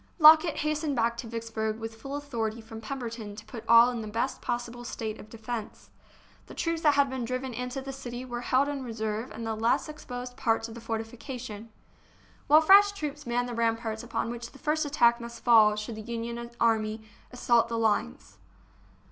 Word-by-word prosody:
Lockett 315 0 +8
hastened 305 -1 -1
back 235 0 +1
to 235 - -6
Vicksburg 225 -1 -3
with 225 0 -6
full 275 +5 -7
authority 235 -6 -3
from 225 0 -10
Pemberton 230 -3 -6
to 215 - -10
put 230 -4 -8
all 235 +2 +7
in 240 -2 -4
the 215 - -6
best 230 +5 -2
possible 240 0 -4
state 220 -2 -5
of 210 - -12
defence. 225 -1 -7 0.6
The - - -11
troops 330 -1 -1
that 300 -3 +4
had 280 -1 +4
been 260 -2 -4
driven 255 +2 -3
into 250 +3 -4
the 270 0 -6
city 250 -2 -6
were 240 -1 -5
held 260 +3 +2
in 285 -2 -3
reserve 220 0 -3
in 230 - -7
the 225 0 -2
less 225 +7 +1
exposed 250 -5 -7
parts 225 -1 0
of 225 - -10
the 235 - -9
fortifica 225 +3 -5
tion, 225 -2 -8 0.8
while 305 +2 +7
fresh 400 +5 +7
troops 300 -7 -5
manned 245 +1 0
the 245 - -5
ramparts 225 -1 -1
upon 230 - -3
which 240 0 -7
the - - -13
first 310 +2 0
attack 240 -5 +3
must 235 0 -9
fall 220 -3 +6
should 215 +2 -5
the 215 - -7
Union 235 +1 -5
army 220 -1 +1 0.3
assault 235 -2 +3
the 230 - -2
lines. 210 - -1
235 Hz, 195 wpm, -28 LUFS, 225-265 Hz, 0.8 s, Lockett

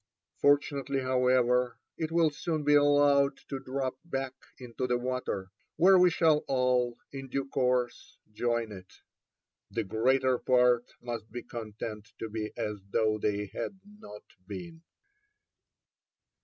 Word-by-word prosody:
Fortunately, 140 -1 +2
however, 125 -1 +2 0.2
it 160 -1 -3
will 165 -2 +3
soon 155 +1 -3
be 145 0 +4
allowed 145 -1 +4
to 135 - -3
drop 130 0 -3
back 135 -5 -3 0.2
into 125 0 -4
the 125 -1 +1
water, 120 -7 -3 0.2
where 185 +3 +6
we 180 0 +6
shall 160 -3 +3
all, 125 -2 +1
in 135 -1 -7
due 135 +1 -1
course, 125 -2 -1 0.2
join 115 0 -1
it. 95 -2 -11 0.4
" - - -61
The 115 - +1
greater 130 +5 +2
part 125 -1 +3 0.2
must 120 -2 -5
be 120 +2 -6
content 110 -1 -7
to 115 - -5
be 110 0 -4
as 105 -1 -3
though 110 0 +1
they 105 -1 -1
had 195 - -5
not 205 - -12 0.2
been." 165 - -8
125 Hz, 135 wpm, -30 LUFS, 115-140 Hz, 0.4 s, where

